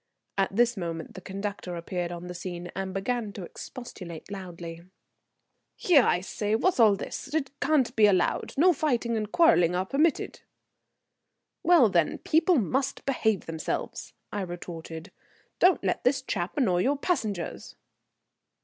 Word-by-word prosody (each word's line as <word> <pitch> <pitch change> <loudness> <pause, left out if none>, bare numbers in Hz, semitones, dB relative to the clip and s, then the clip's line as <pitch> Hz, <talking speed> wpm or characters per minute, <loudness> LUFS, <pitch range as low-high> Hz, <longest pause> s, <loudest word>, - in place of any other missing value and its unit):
At 195 0 0
this 240 +1 +3
moment 165 -3 -5
the 185 - -9
conductor 195 -2 -5
appeared 175 +1 -3
upon 175 0 -7
the 180 - -6
scene, 175 0 -6
and 190 0 -3
began 210 +3 -2
to 195 - -7
expostulate 185 - -9
loudly. 170 -4 -7 0.9
"Here, 330 -7 +5
I 180 -6 +2
say, 205 +3 -1
what's 350 +6 +1
all 215 -3 +7
this? 270 +7 -6
It 275 -4 0
can't 275 -6 +2
be 215 -1 +6
allowed. 185 -3 +1
No 355 +5 +6
fighting 245 -6 0
and 215 -1 -3
quarrelling 180 - +4
are 185 +1 0
permitted." 300 +9 0 1.2
"Well, 340 -9 +6
then, 170 -5 +1
people 325 +2 +3
must 260 +4 -1
behave 220 -7 +1
themselves," 160 -1 -4 0.2
I 205 - -1
retorted. 170 -1 -7 0.5
"Don't 365 +1 +4
let - - -1
this 265 +1 +2
chap 180 -5 -3
annoy 190 -11 +2
your 275 +10 +2
passengers." 215 - -3
205 Hz, 145 wpm, -27 LUFS, 175-260 Hz, 1.2 s, all